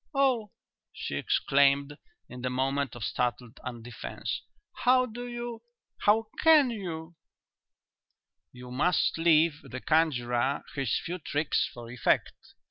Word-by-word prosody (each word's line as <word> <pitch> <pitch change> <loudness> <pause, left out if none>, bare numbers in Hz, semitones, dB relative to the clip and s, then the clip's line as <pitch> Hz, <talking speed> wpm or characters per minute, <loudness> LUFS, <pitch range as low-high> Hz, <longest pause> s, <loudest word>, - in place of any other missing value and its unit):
"Oh!" 255 -6 +2 0.4
she - - -6
exclaimed, 140 - +2 0.3
in 125 0 -9
the 125 - -1
moment 135 +1 -1
of 120 - -7
startled 120 +4 -2
undefence, 120 -1 -5 0.4
"how 255 0 +4
do 245 +1 -7
you 240 -1 -5 0.4
how 220 +2 +4 0.2
can 305 -6 +6
you 170 -6 -6 0.7
" - - -56
"You 125 0 -9
must 165 +5 +1
leave 160 -2 +4
the 130 - -7
conjurer 130 -5 +1
his 135 -6 0
few 180 +2 -4
tricks 150 0 0
for 120 -1 -10
effect. 125 - +1
145 Hz, 125 wpm, -29 LUFS, 125-210 Hz, 0.7 s, can